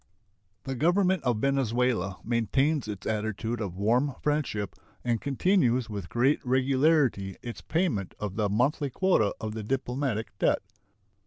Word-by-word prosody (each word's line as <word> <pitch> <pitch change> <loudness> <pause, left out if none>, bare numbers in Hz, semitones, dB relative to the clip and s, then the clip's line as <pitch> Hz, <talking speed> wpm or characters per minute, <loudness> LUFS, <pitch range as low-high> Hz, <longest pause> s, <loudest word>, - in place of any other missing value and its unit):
The 135 - -3
Government 180 +6 +2
of 125 -4 +1
Venezuela 120 -6 +1
maintains 125 - +1
its 100 -2 -6
attitude 110 +2 -2
of 95 -4 -4
warm 125 +7 +2
friendship 145 - -1 0.3
and 120 -2 0
continues 130 - +2
with 100 -4 -5
great 130 +5 +2
regularity 130 - +2
its 120 -1 -6
payment 150 - -1
of 100 -2 -4
the 105 -2 +1
monthly 135 +7 +1
quota 135 - +2
of 110 -1 -4
the 110 - -4
diplomatic 125 -2 -2
debt. - - +2
125 Hz, 135 wpm, -28 LUFS, 105-140 Hz, 0.3 s, Government